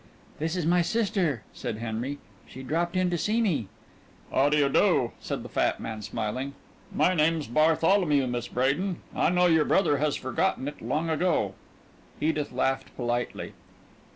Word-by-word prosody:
"This 160 +3 -1
is 175 -4 -1
my 175 +2 +4
sister," 180 - 0
said 110 - -4
Henry. 115 +5 -3 0.3
"She 130 - -10
dropped 170 +6 -1
in 185 -1 +2
to 175 - 0
see 215 +6 +1
me." 160 - +1 0.6
"How 140 +2 +3
do 150 - +2
you 145 -2 +4
do?" 135 - +3
said - - -4
the - - -7
fat - - 0
man, 110 -1 -5
smiling. 120 +6 -4 0.4
"My 185 - +3
name's 160 -2 +2
Bartholomew, 155 - +3
Miss 120 -1 -3
Bradin. 150 +10 0 0.2
I - - +3
know 180 0 +3
your 160 -3 +5
brother 170 -7 +3
has 150 -1 +1
forgotten 130 +1 -1
it 145 - -7
long 160 +3 -1
ago." 155 - +1 0.7
Edith 155 -1 0
laughed 135 0 -1
politely. 120 0 -2
150 Hz, 160 wpm, -27 LUFS, 130-175 Hz, 0.7 s, your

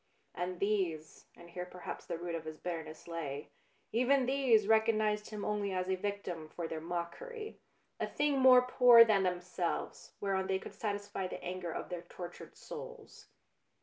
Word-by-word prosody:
And 180 0 -3
these, 185 -7 -1
and 170 0 -14
here 180 0 -5
perhaps 180 0 -8
the - - -3
root 170 0 -4
of 165 -1 -4
his 155 0 -6
bitterness 160 -2 -6
lay, 150 -4 -5 0.4
even 255 +3 +3
these 250 -6 +3
recognised 215 -1 +3
him 210 -2 -5
only 205 -2 -1
as 185 0 -1
a 190 - +1
victim 185 -5 -4
for 170 0 -5
their 160 -1 -5
mockery, 425 - -5 0.4
a - - -1
thing 290 -2 +1
more 255 -1 +8
poor 245 -2 +8
than 210 -3 +3
themselves, 180 -1 -2
whereon 190 -1 0
they 190 - +1
could - - -9
satisfy 205 -2 -3
the - - -7
anger 180 -1 -4
of - - -5
their 175 -2 -4
tortured 175 0 -10
souls. - - -10
190 Hz, 165 wpm, -33 LUFS, 175-220 Hz, 0.4 s, more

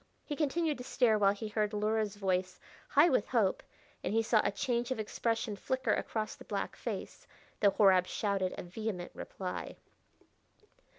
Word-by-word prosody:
He 295 - -3
continued 305 0 0
to - - -5
stare 240 -4 +3
while 200 -1 +5
he 215 +2 -5
heard 210 0 -1
Luhra's 210 0 0
voice, 185 -2 -1 0.3
high 300 +3 +6
with 255 -9 +2
hope, 220 -7 +2 0.4
and - - -1
he 225 - +3
saw 220 -1 +4
a - - +1
change 240 +2 -1
of 260 - -1
expression 225 0 -1
flicker 260 +6 0
across 215 -1 -2
the - - -13
black - - -3
face, - - -6 0.3
though 205 - +6
Horab 190 -2 +5
shouted 195 -3 -1
a - - -5
vehement 180 0 -4
reply. 185 -2 -6
215 Hz, 165 wpm, -32 LUFS, 195-240 Hz, 0.4 s, high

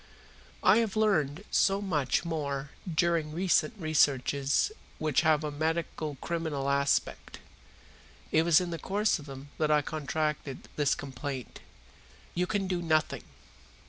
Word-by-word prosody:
"I - - +6
have 225 -3 0
learned 185 -7 +1
so 195 0 +3
much 160 -10 0
during 160 +2 -1
some 150 - -9
recent 190 +5 +2
researches 145 - +2 0.3
which 155 -3 +1
have 155 -2 +3
a 150 - -2
medico 155 -1 -2
criminal 155 -5 -2
aspect. 140 0 0 0.9
It 160 - +4
was 165 -1 +5
in 180 -1 -3
the 165 - -4
course 205 -1 +1
of 150 - -11
them 135 +1 -9
that 155 -1 +2
I 150 -1 +4
contracted 150 -2 -3
this 145 -1 +2
complaint. 135 -2 -6 0.7
You 180 +1 0
can 205 -1 -1
do 180 -2 -1
nothing." 155 -2 +1
155 Hz, 135 wpm, -29 LUFS, 145-175 Hz, 0.9 s, I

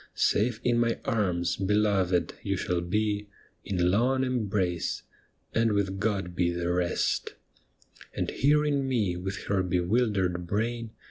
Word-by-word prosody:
'" - - -40
Safe 110 +1 +2
in 120 -1 +2
my 115 -1 +1
arms, 90 -6 0
beloved, 95 -4 +1
you 100 -1 -1
shall 90 -1 -1
be 105 +3 -1 0.4
In 90 -2 +1
long 130 +6 +2
embrace, 100 -9 -1 0.3
" - - -42
and 115 -1 +2
with 95 -1 0
God 100 -4 -1
he 90 -1 +2
the 85 0 -1
rest" 90 -1 0 0.4
' - - -22
And - - -1
hearing 145 -1 +2
me 110 -9 +1
with 95 +2 -5
her 100 -2 +1
bewildered 90 -1 0
brain. 115 +4 -1
100 Hz, 145 wpm, -28 LUFS, 90-115 Hz, 0.4 s, Safe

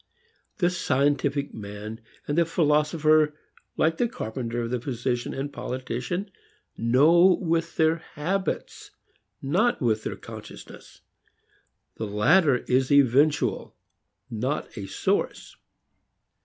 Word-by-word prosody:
The 175 -2 +2
scientific 140 -3 0
man 105 +2 -8 0.3
and 145 - -1
the 170 - +4
philosopher 155 -1 +2 0.4
like 165 +1 +2
the 245 - +2
carpenter, 120 - -4
the 120 0 -2
physician 120 -1 -2
and 140 +1 -5
politician 130 - -4 0.4
know 160 +10 +5
with 165 -1 -1
their 160 0 +3
habits 180 +4 -4 0.5
not 185 - +1
with 110 -3 +1
their - - -4
"consciousness." - - -12 1.0
The 110 - -3
latter 125 - +3
is 130 +1 +2
eventual, 140 +2 +3 0.6
not 125 +3 -3
a 100 -4 -6
source. - - -2
140 Hz, 100 wpm, -25 LUFS, 120-165 Hz, 1.0 s, know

